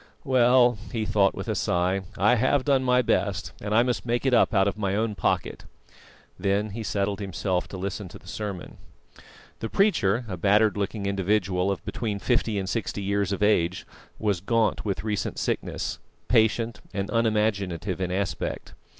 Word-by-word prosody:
"Well," 125 -4 +4
he 115 -4 -2
thought, 105 -2 +2
with - - -6
a - - 0
sigh, 90 +2 0 0.2
"I 105 +6 +4
have 130 +3 +2
done 135 -2 +3
my 125 0 +3
best, - - 0
and 105 +1 -1
I 115 - +6
must 125 -1 -1
make 120 +2 -1
it 135 - +2
up 120 - +4
out 95 -2 +3
of 100 - -1
my 100 -2 -1
own 110 0 0
pocket." - - -1 0.8
Then 100 +1 0
he 115 +3 -5
settled 100 -1 -1
himself 95 -2 -2
to 95 - -8
listen 100 +1 -4
to - - -11
the - - -21
sermon. 100 0 -6 0.8
The 115 - -4
preacher, 125 - +2
a 90 -3 -4
battered 105 +4 +3
looking 100 0 -3
individual 95 -1 +1
of 95 -3 -3
between 105 -4 -3
fifty 110 -1 0
and 95 -1 -2
sixty 105 -1 -3
years 100 0 0
of 100 +1 -1
age, 95 -4 +2 0.3
was 100 -5 0
gaunt 115 +2 +1
with 100 -2 -2
recent 105 -2 -2
sickness, - - -2 0.3
patient 115 -1 +2
and 100 0 -2
unimaginative 105 -6 0
in 90 -1 -1
aspect. 95 +1 -3
105 Hz, 175 wpm, -26 LUFS, 95-115 Hz, 0.8 s, I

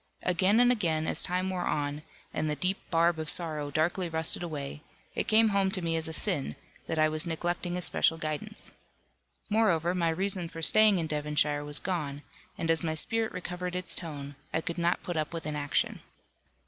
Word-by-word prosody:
Again 185 +5 +3
and 245 0 +6
again, 165 -9 0
as - - +1
time 185 +1 +1
wore 180 -1 -2
on, 145 0 -1 0.3
and 155 - -1
the 150 - -1
deep 185 +5 +1
barb 165 0 +2
of 155 -1 -3
sorrow 155 -4 +2
darkly 170 +5 0
rusted 160 +1 0
away, 150 -4 -5 0.3
it - - -2
came 220 0 +5
home 200 -1 +2
to 190 -1 0
me 165 -1 0
as 160 0 +2
a - - -4
sin, 155 - +2 0.3
that 160 - -2
I 155 0 +4
was 155 +2 0
neglecting 175 +2 -2
a 180 - -2
special 165 - +2
guidance. 160 +8 -5 0.8
Moreover, 180 -6 +2
my 170 -2 +1
reason 185 0 -1
for 165 0 -8
staying 215 +2 +6
in 165 - -1
Devonshire 150 -1 0
was 145 0 -2
gone, 150 -6 -3 0.3
and 165 -1 0
as 165 - +2
my 160 -2 -2
spirit 225 +7 +1
recovered 180 0 -5
its 180 0 +3
tone, 145 -4 -6 0.2
it 160 - -2
could 170 0 -3
not 170 +1 +1
put 175 -2 -4
up 155 +2 -2
with 165 - -5
inaction. 150 -1 -1
165 Hz, 195 wpm, -29 LUFS, 155-185 Hz, 0.8 s, and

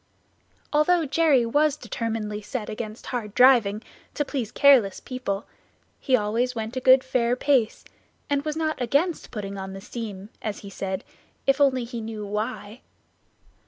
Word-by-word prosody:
Although 320 +3 +3
Jerry 290 -4 +3
was 295 +5 +2
determinedly 220 -6 -4
set 210 +1 -5
against 215 0 -6
hard 220 -5 -4
driving, 235 -5 +5 0.3
to 295 - 0
please 255 -7 -3
careless 255 -9 +5
people, 235 -6 -4 0.5
he 265 - +2
always 235 +3 0
went 225 +2 -4
a - - 0
good 260 0 +6
fair 245 -2 +1
pace, 255 -4 +1 0.4
and 285 -1 0
was 305 0 -3
not 310 -4 -1
against 285 +8 0
putting 200 -3 -6
on 190 0 -6
the 195 - -7
steam, 205 -2 -7
as 210 -2 -4
he 200 - -10
said, 190 0 -4 0.4
if 275 +1 +2
only 260 -3 +3
he 235 0 -6
knew 220 -1 -6
why. 210 +2 -4
240 Hz, 155 wpm, -25 LUFS, 210-270 Hz, 0.5 s, good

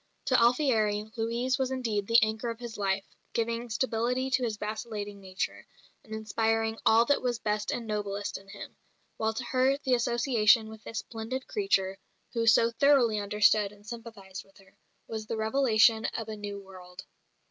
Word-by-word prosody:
To 255 -3 +3
Alfieri, 220 -5 +2
Louise 240 +3 -1
was 260 -1 0
indeed 225 -6 -2
"the 230 - +5
anchor 220 +2 -1
of 230 - -4
his 240 -2 -7
life," 195 -1 -1 0.3
giving 230 +1 -1
stability 250 +3 -1
to 260 -1 +2
his 220 -3 -2
vacillating 210 -1 -5
nature, 185 -1 -4 0.4
and 220 - -19
inspiring 225 +1 -1
all 225 +1 +6
that 285 +3 +2
was 245 -2 -1
best 210 -1 -2
and 240 - -2
noblest 205 -2 -3
in 195 - -19
him; 200 0 -10 0.4
while 220 0 -1
to 245 - -3
her 260 +2 +2
the 265 -3 -1
association 235 -2 +3
with 220 -1 -12
this 225 - -7
"splendid 235 +4 -5
creature," 195 - 0 0.3
who 230 -1 0
so 230 +1 +5
thoroughly 245 -4 +4
understood 210 0 +3
and 205 0 -18
sympathised 215 -5 -8
with 195 0 -24
her, 195 0 -21 0.3
was 220 -1 -5
the 225 - -3
revelation 220 -1 +3
of 225 - -4
a 215 - -4
new 205 -1 -6
world. 185 -1 -12
220 Hz, 170 wpm, -29 LUFS, 210-240 Hz, 0.4 s, all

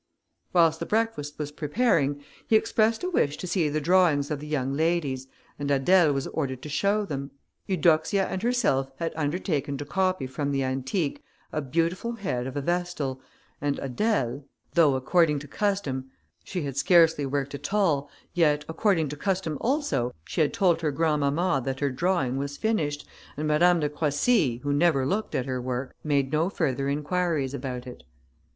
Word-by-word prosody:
Whilst 165 -2 +4
the - - -4
breakfast 215 -10 -1
was 150 -1 -4
preparing, 150 - +1 0.2
he 225 - +4
expressed 220 +2 +2
a 365 - 0
wish 145 - +1
to - - -6
see 170 -4 +1
the 155 +1 0
drawings 160 -3 +3
of 150 - -2
the 150 - -8
young 135 -3 -1
ladies, 150 -4 0 0.3
and 145 0 -2
Adèle 155 +4 +4
was 135 -1 -1
ordered 130 -4 -3
to 150 - -6
show 200 +8 +1
them. 140 -5 -4 0.4
Eudoxia 175 +1 +2
and 185 - -4
herself 210 - +1
had 165 +2 -3
undertaken 150 -2 -1
to 145 - -5
copy 185 +1 0
from 140 +2 -3
the 135 -1 0
antique 135 +5 -2 0.3
a 155 - 0
beautiful 170 - -1
head 130 - -3
of 135 +2 -5
a - - 0
vestal, 175 -5 -2 0.4
and 145 0 0
Adèle, 140 - -1 0.3
though 155 -5 +5
according 150 +3 +2
to 145 +1 -7
custom, 145 -9 -2 0.3
she 180 -4 -4
had 140 -2 -4
scarcely 165 -2 +4
worked 140 0 -2
at 140 - -5
all, 165 -9 +1 0.2
yet, 150 -4 +2
according 165 -1 +1
to 150 - -5
custom 185 -1 -1
also, 225 - 0
she - - -1
had 150 - +3
told 175 -4 +2
her 155 - +1
grandmamma 150 +1 +1
that 130 +1 -3
her 140 -2 0
drawing 135 -3 0
was 140 +1 -4
finished, 155 -10 -1 0.3
and 155 +1 -2
Madame 170 +3 +4
de 150 - +1
Croissy, 150 - +1
who 145 0 0
never 145 -3 +3
looked 205 +10 -1
at 125 - 0
her 130 -1 -2
work, 125 +1 -4
made 140 -3 +1
no 160 +4 +2
further 140 -7 -1
inquiries 150 -1 -1
about 125 -3 -5
it. 125 - -10
150 Hz, 175 wpm, -26 LUFS, 140-180 Hz, 0.4 s, though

